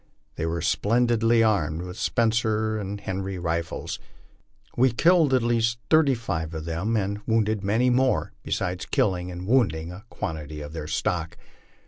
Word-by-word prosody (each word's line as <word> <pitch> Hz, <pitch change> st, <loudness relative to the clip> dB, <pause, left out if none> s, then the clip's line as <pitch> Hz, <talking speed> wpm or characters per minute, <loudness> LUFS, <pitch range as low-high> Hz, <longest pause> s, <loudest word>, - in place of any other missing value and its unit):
They 80 Hz, -, -3 dB
were 85 Hz, 0 st, -2 dB
splendidly 115 Hz, +4 st, +3 dB
armed 85 Hz, -7 st, +1 dB
with 90 Hz, 0 st, -7 dB
Spencer 110 Hz, -1 st, +1 dB
and 100 Hz, 0 st, -5 dB
Henry 95 Hz, -1 st, -4 dB
rifles. 85 Hz, -1 st, -3 dB, 0.8 s
We 130 Hz, +1 st, +4 dB
killed 165 Hz, +4 st, +4 dB
at 130 Hz, -2 st, +3 dB
least 115 Hz, 0 st, +1 dB
thirty 155 Hz, -4 st, +5 dB
five 85 Hz, -8 st, -4 dB
of 80 Hz, 0 st, -5 dB
them 90 Hz, +8 st, -1 dB
and 100 Hz, 0 st, -2 dB
wounded 110 Hz, -2 st, +1 dB
many 115 Hz, +6 st, +2 dB
more, 130 Hz, +1 st, +2 dB
besides 90 Hz, 0 st, -3 dB
killing 90 Hz, -3 st, 0 dB
and 90 Hz, 0 st, -6 dB
wounding 90 Hz, -9 st, +1 dB
a 100 Hz, +5 st, -11 dB
quantity 75 Hz, -1 st, -5 dB
of 75 Hz, +1 st, -8 dB
their 80 Hz, -2 st, -5 dB
stock. 85 Hz, +1 st, -2 dB
100 Hz, 150 wpm, -25 LUFS, 85-115 Hz, 0.8 s, thirty